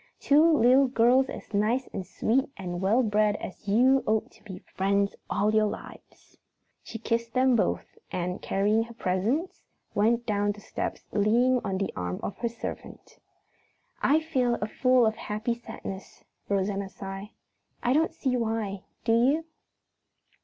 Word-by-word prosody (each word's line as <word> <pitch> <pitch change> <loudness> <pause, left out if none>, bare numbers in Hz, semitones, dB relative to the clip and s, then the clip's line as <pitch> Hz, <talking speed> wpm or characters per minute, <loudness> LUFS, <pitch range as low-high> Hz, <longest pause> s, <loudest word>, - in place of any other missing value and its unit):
Two 290 +2 +4 0.2
little 260 +3 +5
girls 250 +2 +3
as - - -9
nice 225 +6 +1
and 190 -3 -5
sweet 250 +7 0
and 175 -2 -5
well 220 +7 +3
bred 210 -1 +2
as 205 +1 -8
you 255 +6 +4
ought 220 0 0
to - - -22
be 190 -4 -8
friends 200 +2 -1
all 210 +2 +1
your 215 0 +4
lives." - - -10 0.4
She 225 - -8
kissed 230 +1 -2
them 255 0 +4
both 340 - -1
and, 180 +1 -3
carrying 205 +3 +1
her 235 0 -13
presents, 225 - -1 0.3
went 230 +3 +2
down 205 -1 0
the 210 - -13
steps - - -5
leaning 235 +5 +3
on 195 -1 -2
the 195 - -2
arm 90 -1 -3
of - - -4
her 235 - -1
servant. 235 - -8 0.8
"I 300 +3 +4
feel 255 -7 0 0.2
full 255 -2 +5
of 220 - +2
a - - -20
happy 215 +3 -2
sadness," 225 -5 -9 0.3
Rosanna 200 0 -1
sighed. 195 +1 -7 0.5
"I 245 - +2
don't 320 +3 +2
see 260 -2 -1
why, 220 -5 -2 0.2
do 225 - +3
you?" 270 +8 +3
220 Hz, 155 wpm, -27 LUFS, 200-245 Hz, 0.8 s, little